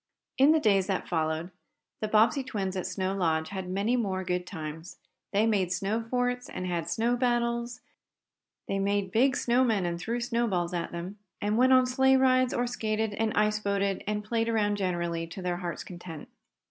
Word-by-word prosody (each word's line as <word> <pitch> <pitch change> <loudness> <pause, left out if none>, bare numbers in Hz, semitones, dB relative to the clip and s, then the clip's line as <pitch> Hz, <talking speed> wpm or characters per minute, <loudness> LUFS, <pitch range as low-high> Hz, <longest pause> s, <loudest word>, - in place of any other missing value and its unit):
In 275 +3 +7
the 320 - +4
days 200 -7 +3
that 195 -2 -2
followed, 160 +1 -1 0.5
the 215 - -2
Bobbsey 225 +5 +3
twins 195 -6 -3
at 185 - -2
Snow 190 0 -2
Lodge 160 -4 0
had 190 -2 -5
many 200 +6 +1
more 195 -6 -1
good 180 -1 -2
times. 160 0 -7 0.3
They 210 +2 +3
made 200 -5 +1
snow 200 +5 -1
forts, 245 +1 -1
and 185 - -5
had 175 -3 -2
snow 235 +2 +1
battles, 240 -1 0 0.9
they 195 - -1
made 200 -1 0
big 250 +5 +3
snow 245 +2 +2
men 215 -7 +1
and 170 0 -2
threw 230 +7 -2
snowballs 230 -8 0
at 170 -1 -3
them, 180 +4 -6 0.2
and 210 +1 0
went 255 +3 +5
on 255 0 +6
sleigh 265 +1 +3
rides, 255 -1 +3
or 245 - 0
skated 220 -3 -1
and 220 +1 0
ice 210 0 +2
boated 200 -1 -1
and 210 0 -1
played 230 +1 -1
around 205 -2 +1
generally, 170 -3 -2
to 170 - -9
their 175 -1 -1
hearts' 175 -2 -5
content. 175 -4 -9
205 Hz, 185 wpm, -28 LUFS, 180-235 Hz, 0.9 s, In